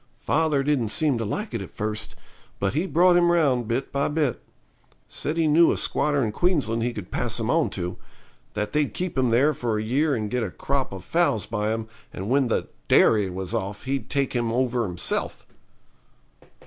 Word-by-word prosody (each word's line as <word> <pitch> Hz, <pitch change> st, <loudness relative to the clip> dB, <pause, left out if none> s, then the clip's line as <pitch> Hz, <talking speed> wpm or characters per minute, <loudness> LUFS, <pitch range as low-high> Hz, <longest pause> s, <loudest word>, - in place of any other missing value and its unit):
'Father 155 Hz, -4 st, +1 dB
didn't 140 Hz, -5 st, +1 dB
seem 145 Hz, -2 st, +1 dB
to 115 Hz, -, -2 dB
like 210 Hz, -, -4 dB
it 115 Hz, -, -2 dB
at 95 Hz, -, -7 dB
first, 105 Hz, +1 st, -4 dB, 0.4 s
but 100 Hz, -1 st, 0 dB
he 160 Hz, +7 st, 0 dB
brought 175 Hz, +3 st, +4 dB
him 175 Hz, -1 st, +4 dB
round 135 Hz, -9 st, +2 dB
bit 120 Hz, +4 st, -2 dB
by 140 Hz, 0 st, 0 dB
bit 150 Hz, -4 st, -1 dB, 0.7 s
said 155 Hz, +3 st, -3 dB
he 165 Hz, -, +2 dB
knew 160 Hz, +2 st, +5 dB
a -, -, -1 dB
squatter 145 Hz, -1 st, +1 dB
in 110 Hz, -, -1 dB
Queensland 130 Hz, -, +1 dB
he 120 Hz, +1 st, 0 dB
could 105 Hz, -6 st, -8 dB
pass -, -, -1 dB
him -, -, 0 dB
on -, -, +2 dB
to; 90 Hz, 0 st, -5 dB, 0.6 s
that 105 Hz, 0 st, -2 dB
they'd 150 Hz, -1 st, 0 dB
keep 180 Hz, -1 st, -3 dB
him 130 Hz, -2 st, +2 dB
there 135 Hz, +7 st, +3 dB
for 120 Hz, -5 st, -2 dB
a 105 Hz, -, -2 dB
year 140 Hz, +6 st, +1 dB
and 105 Hz, -3 st, -3 dB
get 125 Hz, -, 0 dB
a 110 Hz, -, -2 dB
crop 135 Hz, +8 st, -2 dB
of 95 Hz, -2 st, -7 dB
foals 165 Hz, -, +1 dB
by 105 Hz, -1 st, -1 dB
him, 110 Hz, 0 st, -3 dB, 0.2 s
and 95 Hz, +5 st, -5 dB
when 135 Hz, -1 st, +3 dB
the 115 Hz, -, -1 dB, 0.2 s
"derry" 105 Hz, -3 st, +4 dB
was 95 Hz, +2 st, -5 dB
off 105 Hz, -2 st, -3 dB
he'd 135 Hz, 0 st, -3 dB
take 140 Hz, -2 st, 0 dB
him 120 Hz, -2 st, 0 dB
over 125 Hz, -1 st, 0 dB
himself.' 90 Hz, -1 st, -2 dB
125 Hz, 200 wpm, -24 LUFS, 110-150 Hz, 0.7 s, knew